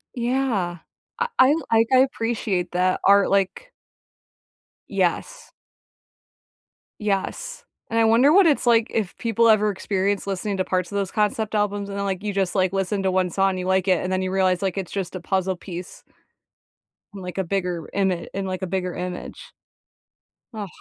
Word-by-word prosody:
Yeah. 235 -8 -1 0.4
Uh, 475 - +1
I'll 295 +5 +5
like, 225 0 +4
I 255 - +7
appreciate 225 -7 0
that 185 +1 +1
art, 200 0 +5
like 200 - 0 1.2
Yes. - - -2 1.5
Yes, 210 - -3 0.3
and 230 - +1
I - - +5
wonder 235 +6 +5
what 385 +3 +6
it's 295 -5 +2
like 230 -1 +4
if 210 -5 -2
people 230 0 +2
ever 215 -1 +4
experience 195 0 -1
listening 195 +1 -2
to 185 - +1
parts 185 0 -2
of - - -5
those 195 -2 -1
concept 215 0 0
albums, 205 -1 -1
and 200 - -5
then, 200 - -2
like 195 0 -3
you 210 - -1
just, 195 -1 -1
like, 185 -2 +2
listen 195 +1 -1
to 190 - +1
1 185 -1 +1
song, 195 +1 +1
you 180 - -4
like 190 0 +1
it, 180 -2 +3
and 185 - -2
then 185 0 0
you 185 0 -2
realize, 185 -1 +2
like, 195 -1 -2
it's 190 -3 -4
just 190 -3 -3
a 185 - -4
puzzle 190 +1 -1
piece 180 -1 -8 1.1
like, 185 -2 -7
a 190 - +1
bigger 180 -3 -3
ima 190 -3 0
in, 195 0 -3
like, 185 0 -4
a 190 - -2
bigger 185 -1 -2
image. 180 0 -6 1.0
Ugh, 210 -2 -5
195 Hz, 175 wpm, -23 LUFS, 185-220 Hz, 1.5 s, I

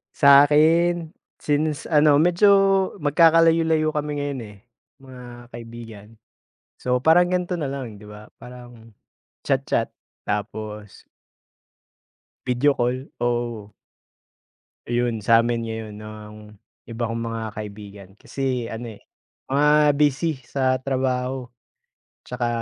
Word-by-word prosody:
Sa 140 0 +7
'kin, 165 +2 +2 0.3
since 150 +1 -1
ano 150 -1 +5
medyo 175 +6 +3 0.6
magkakalayo-layo 160 0 +3
kami 150 -1 -3
ngayon, 140 -2 -4
eh, 105 -1 -14 0.5
mga 125 -2 -12
kaibigan. 115 -3 -10 0.7
So, 125 0 -1
parang 175 +5 +4
gan'to 180 0 -1
nalang 135 -8 -5
'di 105 - -15
ba? 105 +1 -12
Parang, 120 -2 -13 0.6
chat-chat - - 0 0.4
tapos 105 0 -5 1.4
video 130 +3 +2
call, 125 +2 -2
oo. 120 -3 -3 1.1
Ayun, 120 -1 -1
sa 115 +1 +5
'min 115 -1 -2
ngayon 110 -2 -6
nang 105 0 -10 0.5
iba 115 0 -4
kong 115 - -3
mga 115 0 -4 0.2
kaibigan. 100 -2 -9
Kasi 130 -4 -3
ano, 115 0 -7
eh, - - -18 0.5
mga 150 +1 +3
busy 150 +1 +1
sa 130 0 0
trabaho, 130 -1 -2 0.8
'tsaka 125 -1 -3
125 Hz, 105 wpm, -22 LUFS, 115-150 Hz, 1.4 s, Sa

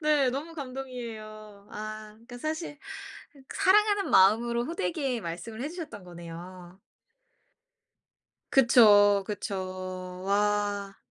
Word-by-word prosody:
네. 295 -4 +3
너무 305 +6 -5
감동이에요. 225 -7 -8
아 215 0 -7
그니까 245 +2 -12
사실 310 0 -4 0.8
사랑하는 405 +1 +3
마음으로 235 +5 +4
호되게 265 - -2
말씀을 210 +7 -6
해 290 - -2
주셨던 320 - -8
거네요. 175 +1 -10 1.7
그쵸 205 -6 +6
그쵸. 185 -2 -5
와. 205 0 0
215 Hz, 215 characters per minute, -28 LUFS, 195-270 Hz, 1.7 s, 그쵸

